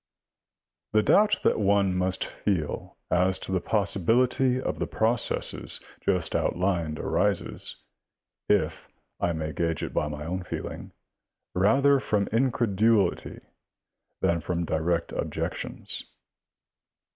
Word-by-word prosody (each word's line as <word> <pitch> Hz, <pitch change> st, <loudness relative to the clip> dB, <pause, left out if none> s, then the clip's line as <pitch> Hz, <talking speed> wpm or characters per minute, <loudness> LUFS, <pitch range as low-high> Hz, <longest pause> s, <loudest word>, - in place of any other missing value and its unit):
The 110 Hz, 0 st, +4 dB
doubt 210 Hz, -, +4 dB
that -, -, +3 dB
one 100 Hz, -2 st, +3 dB
must 90 Hz, 0 st, 0 dB
feel 90 Hz, -8 st, -3 dB
as 95 Hz, +1 st, +3 dB
to -, -, -7 dB
the 95 Hz, -2 st, +1 dB
possibility 120 Hz, +6 st, +2 dB
of -, -, -3 dB
the -, -, -1 dB
pro 110 Hz, +1 st, +2 dB
cesses 120 Hz, -, 0 dB, 0.2 s
just 90 Hz, -4 st, 0 dB
outlined 85 Hz, -4 st, 0 dB
arises, -, -, 0 dB, 0.7 s
if -, -, +1 dB, 0.3 s
I 85 Hz, -, +1 dB
may 80 Hz, -1 st, -3 dB
gauge 85 Hz, +2 st, -1 dB
it -, -, -4 dB
by 75 Hz, -, 0 dB
my 75 Hz, 0 st, -6 dB
own 90 Hz, +3 st, -3 dB
feeling, 90 Hz, -, -6 dB, 0.6 s
rather 135 Hz, +9 st, +4 dB
from 105 Hz, -5 st, 0 dB
incredulity 115 Hz, -4 st, +1 dB, 0.8 s
than 85 Hz, -1 st, +2 dB
from 85 Hz, +1 st, -2 dB
direct 85 Hz, +2 st, 0 dB
objections. -, -, -4 dB
95 Hz, 115 wpm, -27 LUFS, 85-110 Hz, 0.8 s, The